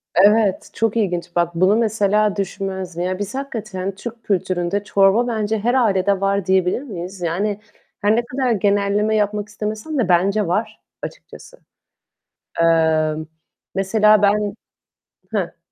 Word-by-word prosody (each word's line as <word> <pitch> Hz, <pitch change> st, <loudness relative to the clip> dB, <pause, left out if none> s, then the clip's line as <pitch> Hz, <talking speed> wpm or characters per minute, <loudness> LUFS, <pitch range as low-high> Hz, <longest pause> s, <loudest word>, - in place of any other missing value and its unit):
Evet, 205 Hz, +1 st, +4 dB
çok 225 Hz, 0 st, 0 dB
ilginç. 175 Hz, -5 st, -2 dB
Bak 170 Hz, -1 st, 0 dB
bunu 185 Hz, +4 st, +4 dB
mesela 210 Hz, -2 st, +2 dB
düşünmezdim. 190 Hz, -3 st, -4 dB
Ya, 185 Hz, +1 st, -2 dB
biz 205 Hz, +3 st, -4 dB
hakikaten 215 Hz, -8 st, -4 dB
Türk 230 Hz, +3 st, -8 dB
kültüründe 185 Hz, 0 st, -1 dB
çorba 200 Hz, +4 st, +3 dB
bence 220 Hz, -2 st, -1 dB
her 235 Hz, +4 st, 0 dB
ailede 200 Hz, -5 st, +2 dB
var 195 Hz, -1 st, +1 dB
diyebilir 190 Hz, +3 st, +2 dB
miyiz? 190 Hz, -7 st, -7 dB
Yani, 195 Hz, +5 st, -1 dB, 0.4 s
her 210 Hz, +1 st, +3 dB
ne 235 Hz, +1 st, 0 dB
kadar 255 Hz, 0 st, -1 dB
genelleme 205 Hz, +1 st, +1 dB
yapmak 210 Hz, 0 st, 0 dB
istemesem 215 Hz, +8 st, -4 dB
de 235 Hz, -8 st, 0 dB
bence 195 Hz, +3 st, +2 dB
var 205 Hz, +6 st, -2 dB, 0.2 s
açıkçası. -, -, -10 dB, 1.0 s
Eee, 160 Hz, -2 st, +3 dB, 0.6 s
mesela 210 Hz, +2 st, +3 dB
ben 205 Hz, 0 st, +2 dB, 0.8 s
he. -, -, -2 dB
200 Hz, 130 wpm, -20 LUFS, 185-215 Hz, 1.0 s, Evet